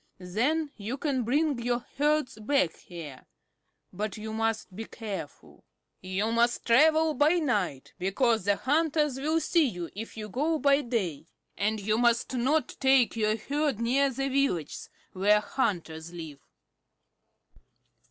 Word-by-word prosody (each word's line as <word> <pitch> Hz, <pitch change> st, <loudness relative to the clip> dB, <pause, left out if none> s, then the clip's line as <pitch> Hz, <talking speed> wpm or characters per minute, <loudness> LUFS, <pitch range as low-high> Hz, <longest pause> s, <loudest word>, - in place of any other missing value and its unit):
Then 255 Hz, -, -1 dB
you 220 Hz, +5 st, -4 dB
can 275 Hz, -3 st, -1 dB
bring 280 Hz, +3 st, +1 dB
your 240 Hz, 0 st, -1 dB
herds 300 Hz, -5 st, +1 dB
back 215 Hz, -, +1 dB
here. 160 Hz, -7 st, -10 dB, 0.7 s
But 210 Hz, +2 st, -4 dB
you 220 Hz, 0 st, -6 dB
must 220 Hz, -3 st, -2 dB
be 225 Hz, +3 st, -5 dB
careful. 200 Hz, -12 st, -8 dB, 0.4 s
"You 190 Hz, +4 st, -1 dB
must 235 Hz, +1 st, +1 dB
travel 310 Hz, +6 st, +4 dB
by 295 Hz, +2 st, +4 dB
night, 210 Hz, -, -1 dB
because 215 Hz, +3 st, +1 dB
the 205 Hz, 0 st, +3 dB
hunters 300 Hz, +1 st, +1 dB
will 310 Hz, +4 st, +1 dB
see 330 Hz, -2 st, +2 dB
you 175 Hz, -7 st, -5 dB
if 225 Hz, +2 st, -7 dB
you 215 Hz, -1 st, -5 dB
go 300 Hz, +9 st, 0 dB
by 280 Hz, -1 st, +3 dB
day. 210 Hz, -, -3 dB, 0.3 s
And 215 Hz, +2 st, 0 dB
you 215 Hz, +2 st, 0 dB
must 240 Hz, +1 st, +2 dB
not 265 Hz, +6 st, +1 dB
take 265 Hz, -3 st, +4 dB
your 215 Hz, -1 st, +1 dB
herd 285 Hz, +1 st, -1 dB
near 265 Hz, +4 st, +2 dB
the 270 Hz, +1 st, -2 dB
villages 265 Hz, -, -1 dB, 0.2 s
where 205 Hz, +3 st, +4 dB
hunters 170 Hz, -8 st, -2 dB
live." 160 Hz, -5 st, -8 dB
235 Hz, 140 wpm, -28 LUFS, 200-280 Hz, 0.7 s, travel